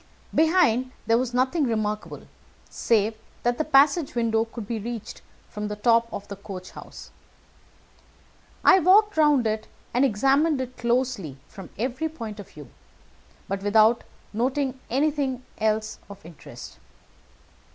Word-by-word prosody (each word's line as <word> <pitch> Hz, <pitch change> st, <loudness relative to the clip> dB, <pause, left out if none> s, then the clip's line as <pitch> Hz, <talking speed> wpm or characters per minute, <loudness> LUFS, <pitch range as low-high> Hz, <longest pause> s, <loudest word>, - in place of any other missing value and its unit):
Behind 305 Hz, -7 st, +3 dB
there 230 Hz, +1 st, +3 dB
was 255 Hz, -1 st, -2 dB
nothing 260 Hz, +5 st, +1 dB
remarkable, 215 Hz, -3 st, -2 dB, 0.5 s
save 220 Hz, -1 st, +1 dB, 0.3 s
that 240 Hz, 0 st, 0 dB
the -, -, +2 dB
passage 295 Hz, +1 st, +3 dB
window 225 Hz, -1 st, +1 dB
could 225 Hz, -1 st, -8 dB
be 230 Hz, 0 st, -3 dB
reached 230 Hz, 0 st, -6 dB, 0.3 s
from 210 Hz, 0 st, -5 dB
the 210 Hz, -, -4 dB
top 230 Hz, +2 st, +2 dB
of 200 Hz, -, -7 dB
the 200 Hz, -, -7 dB
coach 190 Hz, -2 st, -9 dB
house. -, -, -11 dB, 1.5 s
I 380 Hz, -, +7 dB
walked 410 Hz, +5 st, +5 dB
round 295 Hz, -5 st, +4 dB
it 215 Hz, 0 st, -2 dB, 0.3 s
and 245 Hz, +3 st, +3 dB
examined 275 Hz, +5 st, +2 dB
it 255 Hz, -1 st, -5 dB
closely 235 Hz, -, -1 dB
from 195 Hz, -3 st, -11 dB
every 255 Hz, +8 st, -2 dB
point 225 Hz, -9 st, -8 dB
of 205 Hz, -, -10 dB
view, 150 Hz, -3 st, -13 dB, 0.8 s
but 195 Hz, 0 st, -3 dB
without 215 Hz, +3 st, +4 dB, 0.3 s
noting 260 Hz, +3 st, -1 dB
anything 275 Hz, -1 st, 0 dB, 0.2 s
else 215 Hz, 0 st, -1 dB
of 200 Hz, -3 st, -12 dB
interest. 165 Hz, -2 st, -12 dB
235 Hz, 135 wpm, -25 LUFS, 215-270 Hz, 1.5 s, I